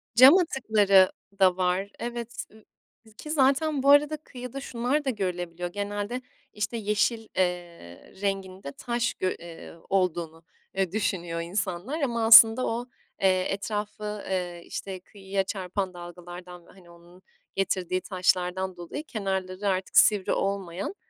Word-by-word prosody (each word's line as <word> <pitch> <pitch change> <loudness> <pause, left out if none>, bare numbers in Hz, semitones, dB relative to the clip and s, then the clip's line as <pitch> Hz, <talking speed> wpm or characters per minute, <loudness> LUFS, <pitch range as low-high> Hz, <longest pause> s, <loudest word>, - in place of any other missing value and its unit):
Cam 265 - +9
atıkları 210 - +4 0.3
da 185 -1 +4
var. 185 +2 0
Evet, 235 0 -5
ııı, 220 0 -18 0.5
ki 305 - -7
zaten 280 0 +2
bu 280 - +4
arada 295 +2 +5
kıyıda 255 -2 -8
şunlar 260 +4 -1
da - - +1
görülebiliyor. 180 -5 -3
Genelde 205 +5 -4 0.3
işte 215 +3 -3
yeşil, 215 +1 0
eee, 175 - -3
renginde 190 -5 -3
taş 240 +6 -2
gö 185 - -2
ııı, 165 -1 -11
olduğunu, 170 -4 -1 0.3
eee, 190 -3 0
düşünüyor 175 -5 -2
insanlar 185 - -3
ama 235 -4 0
aslında 225 +2 +9
o, 240 +2 -3 0.3
eee, 185 -1 +3
etrafı, 210 +1 -4
eee, 180 -2 -3
işte 190 -2 -6
kıyıya 195 0 -4
çarpan 190 -1 -3
dalgalardan 175 0 -10
ve - - -17
hani 185 -2 -18
onun 170 +2 -18 0.3
getirdiği 185 -1 -1
taşlardan 185 0 0
dolayı 175 - -6
kenarları 195 -5 -3
artık 190 -1 -1
sivri 205 -3 +5
olmayan, 195 - -3
195 Hz, 130 wpm, -27 LUFS, 180-225 Hz, 0.5 s, Cam